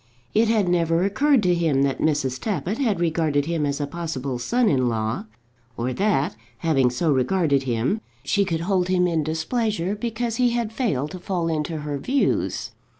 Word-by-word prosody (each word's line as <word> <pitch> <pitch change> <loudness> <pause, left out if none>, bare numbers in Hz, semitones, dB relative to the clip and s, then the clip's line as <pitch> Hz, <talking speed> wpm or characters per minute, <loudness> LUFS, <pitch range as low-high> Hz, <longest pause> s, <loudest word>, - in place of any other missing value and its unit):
It 225 +2 +4
had 215 -4 +2
never 170 -1 +2
occurred 245 +5 +3
to 180 -1 +3
him 160 -6 +2
that 135 -1 0
Mrs. 135 -4 0
Tappitt 200 - -2
had 220 -10 +1
regarded 160 -4 +1
him 160 -2 0
as 140 +1 -2
a 145 - 0
possible 140 -5 -4
son 240 - +1
in 130 -8 +2
law, 110 -1 -2 0.5
or 125 +2 -1
that, 170 - +1 0.2
having 135 -5 +2
so 150 +6 0
regarded 140 +1 +2
him, 125 - 0 0.2
she 200 -2 +2
could 165 -4 -2
hold 180 0 +1
him 180 -1 +2
in 165 -3 +1
displeasure 185 - -1
because 230 +1 -3
he 250 -1 +3
had 235 -2 -1
failed 150 - -1
to 185 - -7
fall 175 -2 -2
into 155 0 -2
her 145 -1 -3
views. 270 - 0
165 Hz, 180 wpm, -23 LUFS, 145-205 Hz, 0.5 s, It